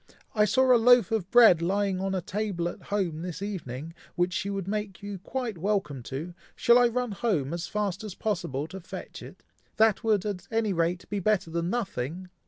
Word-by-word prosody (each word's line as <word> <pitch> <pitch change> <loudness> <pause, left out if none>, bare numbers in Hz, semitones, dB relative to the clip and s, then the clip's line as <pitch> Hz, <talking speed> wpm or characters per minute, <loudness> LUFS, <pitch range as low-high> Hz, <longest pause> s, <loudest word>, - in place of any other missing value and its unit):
I 210 -1 +4
saw 260 +5 +4
a 235 - +3
loaf 245 0 +6
of 210 -5 -1
bread 225 -8 +7
lying 195 +2 0
on 195 0 -1
a 185 - -1
table 195 -3 -2
at - - -7
home 180 -6 -2
this 175 -1 -5
evening, 165 -6 -5 0.2
which 175 0 +1
she 190 +3 -2
would 195 -2 -3
make 210 -1 -4
you 200 -2 -5
quite 230 -1 -4
welcome 190 -8 -1
to! 155 +7 -5 0.2
Shall 240 0 +5
I 245 - +5
run 245 0 -2
home, 180 - -1
as 170 0 -3
fast 205 -1 -2
as 210 -3 -6
possible, 170 -10 -2
to 190 - -7
fetch 185 - -9
it? - - -12 0.3
That 220 0 +4
would, 215 -3 +2
at 200 -4 -4
any 225 -3 0
rate, 170 +1 -1
be 205 - 0
better 195 -3 +1
than 170 +1 -1
nothing!" 185 - -3
195 Hz, 200 wpm, -27 LUFS, 170-215 Hz, 0.3 s, bread